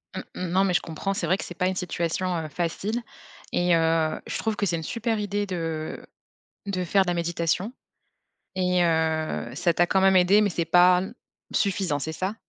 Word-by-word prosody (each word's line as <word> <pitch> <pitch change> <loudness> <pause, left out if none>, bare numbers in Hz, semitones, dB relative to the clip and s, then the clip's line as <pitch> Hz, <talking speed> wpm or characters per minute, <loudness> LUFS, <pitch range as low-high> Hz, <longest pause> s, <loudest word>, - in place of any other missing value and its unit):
Mmh. - - -3
Mmh. 185 - -3
Non, 190 +2 +3
mais 190 -2 +1
je - - +3
comprends, 170 +5 -3
c'est 190 - -2
vrai 185 +3 +2
que - - -5
c'est 175 - -8
pas 180 0 +1
une 190 - -1
situation, 180 0 -2
heu, 160 - -3
facile 185 +9 -2 0.5
et 175 -1 +3
heu, 165 -1 +1
je - - -3
trouve 220 -1 -1
que 205 - 0
c'est 175 - 0
une 160 - -4
super 230 +3 -2
idée 205 0 -1
de 165 -4 -4 0.6
de 185 -2 -1
faire 195 +2 +3
de 180 - -3
la - - +1
méditation 170 +5 -1 0.8
et 180 -1 +2
heu, 160 -5 0
ça 170 +1 +1
t'a 175 - +3
quand 190 - +2
même 190 0 +5
aidé, 185 +3 +5
mais 205 - +2
c'est 170 -1 -2
pas 180 +2 +6
m 190 - -6 0.4
suffisant, 185 -7 0
c'est 160 +3 -4
ça? 190 +6 -3
180 Hz, 210 wpm, -25 LUFS, 165-195 Hz, 0.8 s, pas